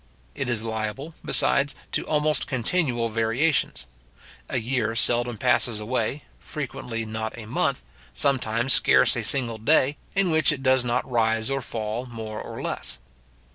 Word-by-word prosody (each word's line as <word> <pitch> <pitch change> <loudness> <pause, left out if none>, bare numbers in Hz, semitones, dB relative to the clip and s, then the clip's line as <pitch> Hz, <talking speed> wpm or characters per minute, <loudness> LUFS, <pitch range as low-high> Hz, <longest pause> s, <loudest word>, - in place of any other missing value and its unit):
It 130 - -4
is 115 -2 +1
liable, 110 +7 -5
besides, 140 +1 +4 0.2
to - - 0
almost 150 0 +1
continual 130 -2 0
variations. 115 - 0 0.6
A - - -2
year 115 -2 -1
seldom 120 0 +1
passes 120 -1 +4
away, 120 +5 -2 0.2
frequently 125 -6 -5
not 110 +1 -5
a 115 - -8
month, 105 - -1 0.3
sometimes 120 - +2
scarce - - +5
a - - -3
single 120 -5 +3
day, 145 +3 +2 0.2
in 195 -3 +1
which 160 -2 +4
it 135 -3 -5
does 130 -1 +3
not 120 +1 -1
rise 115 0 0
or 135 0 -1
fall 115 +1 -4
more 110 -3 -7
or - - -8
less. 65 - -2
120 Hz, 145 wpm, -24 LUFS, 110-135 Hz, 0.6 s, scarce